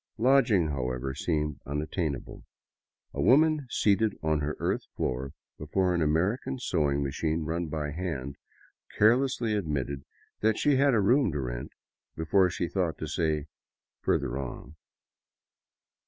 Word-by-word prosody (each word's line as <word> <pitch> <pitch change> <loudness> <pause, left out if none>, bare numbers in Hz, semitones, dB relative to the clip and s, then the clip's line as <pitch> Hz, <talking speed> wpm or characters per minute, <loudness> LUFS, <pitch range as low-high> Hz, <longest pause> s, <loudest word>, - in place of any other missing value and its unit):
Lodging, 115 - +4
.how 65 -4 -2
ever, 65 +2 -3
seemed 75 0 -1
unattainable. 75 0 -3 0.7
A - - -2
woman 155 +1 +4
seated 110 -1 +2
on 80 -1 +2
her 75 +1 -3
earth - - -1
floor 65 +2 -2 0.3
before 90 +5 0
an 85 - 0
American 95 - 0
sewing 75 - 0
machine 80 +4 -1
run 85 +2 -2
by 75 -1 -3
hand 75 -5 -4 0.6
carelessly 120 0 +3
admitted 70 -8 -2 0.4
that 110 0 +2
she 145 -1 +3
had 140 -2 +4
a - - +4
room 120 +3 +3
to 75 - -2
rent - - -4 0.4
before 90 +4 +3
she 90 -1 -2
thought 90 -3 -1
to - - -4
say 75 -2 0 0.3
" - - -65
further 65 -1 0
on." 65 +2 -7
80 Hz, 140 wpm, -28 LUFS, 70-105 Hz, 0.7 s, Lodging